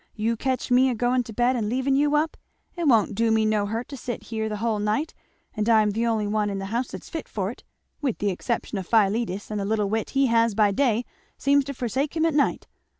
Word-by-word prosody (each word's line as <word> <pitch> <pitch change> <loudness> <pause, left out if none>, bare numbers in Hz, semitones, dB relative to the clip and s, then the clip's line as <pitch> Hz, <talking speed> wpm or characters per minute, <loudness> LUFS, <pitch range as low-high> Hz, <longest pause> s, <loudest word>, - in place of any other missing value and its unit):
You 225 +2 0
catch 260 +2 -2
me 255 +2 +5
a 250 - -1
going 245 +2 +1
to 225 - -8
bed 245 +3 +2
and 215 -4 -1
leaving 260 +3 +1
you 290 +1 +2
up! 310 +2 +1 0.4
It 340 -3 -1
won't 230 -6 +4
do 230 +2 +1
me 220 0 +3
no 210 -1 +1
hurt 225 +3 -3
to 285 - -6
sit 240 0 -5
here 220 -1 -3
the 210 - -3
hull 220 0 -1
night; 215 +10 -1 0.4
and 215 +1 0
I'm 215 -2 +4
the 230 +3 0
only 220 -2 0
one 210 0 0
in 200 - -3
the 195 - -4
house 240 +2 0
that's - - -9
fit 320 - -6
for 195 -1 -2
it, - - -14 0.4
with 270 -6 -1
the 205 -1 0
exception 215 +2 -3
of 185 - -7
Philetus, 215 -2 +1
and 210 - -2
the 200 - -2
little 210 -1 0
wit 220 0 -1
he 275 - +5
has 230 -3 +2
by 210 -1 +4
day 240 0 +1 0.3
seems 280 +1 +3
to 280 - -4
forsake 265 +5 -2
him 320 - +2
at 325 - +1
night. 290 -1 +1
230 Hz, 250 wpm, -25 LUFS, 210-260 Hz, 0.4 s, me